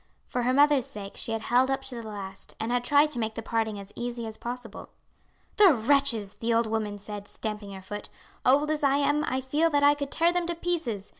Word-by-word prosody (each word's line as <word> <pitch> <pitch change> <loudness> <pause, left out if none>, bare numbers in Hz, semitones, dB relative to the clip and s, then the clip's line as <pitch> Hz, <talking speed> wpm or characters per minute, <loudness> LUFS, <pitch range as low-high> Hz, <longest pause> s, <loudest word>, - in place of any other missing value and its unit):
For 250 - -2
her 245 +1 +1
mother's 285 -1 +4
sake 200 -2 -8
she - - -4
had 225 0 -2
held 255 +2 +3
up 270 0 -1
to 265 - -6
the 235 - -5
last, 200 -3 -7
and 225 +2 -2
had 245 0 +1
tried 290 +3 +4
to 245 - -1
make 220 -1 -2
the 225 - -5
parting 220 -2 -1
as 200 0 -10
easy 240 -1 -4
as 220 -1 -6
possible. 245 0 -7 0.7
"The 390 -8 +7
wretches!" 230 -4 +2
the 230 0 0
old 230 0 +3
woman 215 -2 -2
said, 205 0 -7
stamping 210 -2 -5
her 190 -1 -9
foot. 205 +2 -7 0.3
"Old 290 +4 +4
as 310 - -1
I 280 0 +4
am 290 +1 +2
I 260 -2 -1
feel 295 +5 +1
that 290 -2 +2
I 290 0 +7
could 285 -1 -4
tear 335 +3 +2
them 355 -1 0
to 345 - -2
pieces. 315 - -3
245 Hz, 235 wpm, -27 LUFS, 220-285 Hz, 0.7 s, The